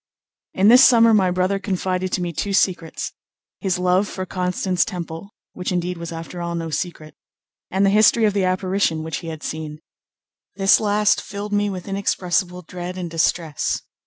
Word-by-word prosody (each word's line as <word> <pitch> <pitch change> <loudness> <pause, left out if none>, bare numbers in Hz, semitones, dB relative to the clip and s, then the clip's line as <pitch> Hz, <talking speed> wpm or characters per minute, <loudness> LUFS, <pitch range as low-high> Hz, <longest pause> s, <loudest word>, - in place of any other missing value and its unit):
In 195 +2 +4
this 250 +3 +8
summer 230 -2 +6
my 190 -4 +4
brother 185 +2 0
confided 185 -1 -2
to 180 - 0
me 170 -1 -3
two 200 +6 -2
secrets, 180 -4 0 0.5
his 190 -3 0
love 180 +2 +2
for 185 -2 -5
Constance 180 -1 0
Temple, 170 +1 -6 0.2
which 180 0 -4
indeed 180 -1 -2
was 170 0 -6
after 165 +2 -7
all 170 0 -3
no 165 -1 -4
secret, 155 -1 -4 0.6
and 195 +2 +1
the 195 - +3
history 220 +2 +5
of 210 - +2
the 200 -1 +1
apparition 185 -3 0
which 160 0 -4
he 170 - -8
had 160 -1 -7
seen. 155 -1 -5 0.8
This 195 -1 +4
last 210 -1 +2
filled 205 +1 -6
me 205 0 +1
with 185 -1 -6
inexpressible 180 -2 -1
dread 180 +2 -7
and 175 -3 -5
distress. 165 -2 0
185 Hz, 175 wpm, -21 LUFS, 170-195 Hz, 0.8 s, this